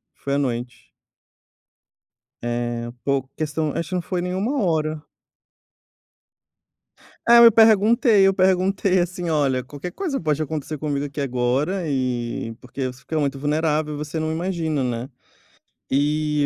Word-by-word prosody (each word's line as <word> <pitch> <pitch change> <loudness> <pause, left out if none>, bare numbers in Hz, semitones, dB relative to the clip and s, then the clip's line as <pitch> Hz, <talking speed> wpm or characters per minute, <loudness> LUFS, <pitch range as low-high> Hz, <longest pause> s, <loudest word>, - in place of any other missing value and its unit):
foi 140 - -4
à - - +2
noite. 125 -3 -3 1.5
Eh, 120 0 -3
pouco 135 -1 0
questão 155 -1 -2
acho 165 -1 -3
que 185 - -2
não 180 - 0
foi 180 0 -3
nem 180 0 -3
1 225 +6 0
hora. 155 -3 0 2.2
É, 235 0 +8
me 230 -1 +9
perguntei, 220 0 +5
eu 195 - +3
perguntei, 185 0 +2
assim: 175 -1 -2
"Olha, 135 -5 +1
qualquer 145 +6 -7
coisa 330 -9 -3
pode 155 -2 0
acontecer 155 0 -4
comigo 145 -1 -2
aqui 145 0 -5
agora", 135 +8 0
e 120 -4 -2
porque 130 +1 -4
você 125 0 -8
fica 160 -1 -3
muito 140 -1 -1
vulnerável 150 +1 0
e - - -5
você 150 +2 -4
não 155 0 -1
imagina, 160 -4 -1
né, 120 +1 -3 0.8
e 150 +1 +1
150 Hz, 140 wpm, -22 LUFS, 135-180 Hz, 2.2 s, me